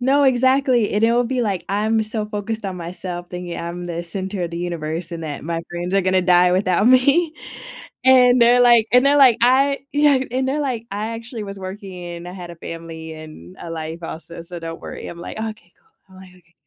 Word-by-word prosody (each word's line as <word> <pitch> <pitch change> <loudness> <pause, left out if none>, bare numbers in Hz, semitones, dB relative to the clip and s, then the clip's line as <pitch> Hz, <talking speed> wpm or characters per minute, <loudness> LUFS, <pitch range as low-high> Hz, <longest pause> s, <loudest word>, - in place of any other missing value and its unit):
No, 275 +3 +3
exactly, 260 -2 +3
and 210 +2 0
it 230 - +4
will 240 +1 +2
be 255 +1 -1
like, 195 -5 -2
I'm 215 +2 +1
so 215 0 -3
focused 215 +1 -4
on 185 - -4
myself 175 0 -6
thinking 180 -1 -6
I'm 175 +1 -5
the 170 0 -4
center 190 +2 -4
of 170 - -3
the 170 - -5
universe 170 -1 -4
and 165 - -5
that 145 -3 -5
my 165 0 -2
friends 175 +2 -4
are 195 - +4
gonna 185 0 +2
die 180 0 +5
without 185 +1 +2
me, 280 +6 +4 0.7
and 250 -1 +6
they're 245 +1 +5
like 235 -2 +5
and 250 +2 +5
they're 285 +1 +4
like, 260 -5 +6
"I" 270 +3 +4
yeah, 290 -2 +4
and 260 +1 -1
they're 290 +3 -1
like, 245 -5 -3
"I 210 +3 -3
actually 230 -1 -6
was 195 0 -8
working, 190 0 -8
and 175 0 -7
I - - -8
had 180 -2 -8
a 170 - -10
family, 165 -1 -8
and 155 - -12
a 170 - -7
life 160 +1 -6
also, 165 +1 -8
so 175 +1 -8
don't 165 0 -7
worry." - - -8
I'm 170 - -8
like, 175 - -7
"Okay, 220 -1 -7
cool." 440 -1 -36
I'm 190 - -17
like, 185 - -14
"Okay." 170 -1 -26
195 Hz, 225 wpm, -21 LUFS, 170-245 Hz, 0.7 s, and